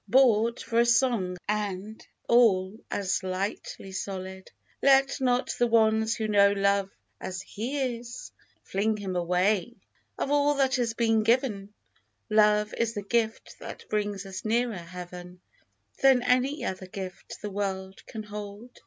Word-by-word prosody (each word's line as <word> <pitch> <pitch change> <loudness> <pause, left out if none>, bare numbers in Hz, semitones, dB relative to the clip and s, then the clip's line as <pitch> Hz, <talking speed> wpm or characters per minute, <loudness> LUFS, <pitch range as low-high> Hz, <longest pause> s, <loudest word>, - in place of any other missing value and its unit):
Bought 235 -3 +4
for 230 - 0
a 235 - +5
song 230 -7 +2
and 210 0 -3 0.2
all 205 -5 +4
as 195 -2 -1
lightly 190 +1 -4
sold. 190 -1 -6 0.3
Let 270 0 +4
not 250 0 +1
the 240 - +4
ones 220 -1 +3
who 220 -2 -2
know 200 -1 +5
Love 200 -1 +1 0.3
as 185 0 -5
he 250 +2 -3
is 240 0 -9 0.3
Fling 210 +3 0
him 195 -3 -4
away! 180 +6 +1 0.4
Of 280 - -2
all 290 0 +3
that 270 -2 +2
has 235 -2 -1
been 225 -2 +2
given, 215 -3 +1 0.6
Love 210 0 +4
is 230 0 0
the 205 - -3
gift 225 +1 -1
that - - -9
brings 205 -2 -2
us 190 -1 -7
nearer 235 +2 +1
Heaven 180 0 -9 0.6
Than 265 -2 +5
any 255 +4 +1
other 185 0 -4
gift 185 -1 -8
the 210 - -4
world 190 -1 -4
can 220 -2 -6
hold. 210 +3 -9
210 Hz, 145 wpm, -27 LUFS, 195-235 Hz, 0.6 s, a